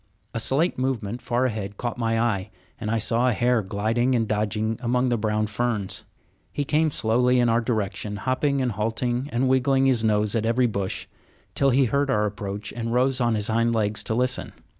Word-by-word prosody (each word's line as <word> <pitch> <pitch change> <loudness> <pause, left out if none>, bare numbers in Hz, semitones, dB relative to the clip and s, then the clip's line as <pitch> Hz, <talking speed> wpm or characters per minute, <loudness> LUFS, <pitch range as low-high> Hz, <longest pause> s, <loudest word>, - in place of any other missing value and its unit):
A 115 - -2
slight 135 +7 +1
movement 125 -3 -2
far 120 +2 0
ahead 105 -4 -3
caught 120 -1 -3
my 115 -1 +1
eye, 105 -4 0 0.3
and 105 - -4
I 115 - +1
saw 115 +3 +1
a - - +1
hare 120 +2 +2
gliding 110 +6 0
and 115 -2 +1
dodging 110 +1 -1
among 125 +1 +1
the 120 - +2
brown 110 0 0
ferns. 110 -2 -2 0.5
He 145 - -2
came 155 +2 +2
slowly 125 0 +2
in 120 -1 +3
our 115 +1 +3
direction, 105 -3 -2
hopping 135 +5 0
and 125 -2 0
halting 120 +5 -2
and 125 +2 +1
wiggling 130 +1 +3
his 125 -4 +2
nose 105 -1 +2
at 110 - +1
every 120 +3 +2
bush, 100 -5 -2 0.5
till 140 - +3
he 135 +1 +4
heard 140 +4 0
our 105 -5 +2
approach 105 0 -5
and 115 -1 -4
rose 130 +1 +2
on 120 -2 +2
his 105 -1 -1
hind 115 +1 +2
legs 105 -1 0
to 110 - -1
listen. 125 +2 -1
115 Hz, 200 wpm, -24 LUFS, 110-125 Hz, 0.5 s, he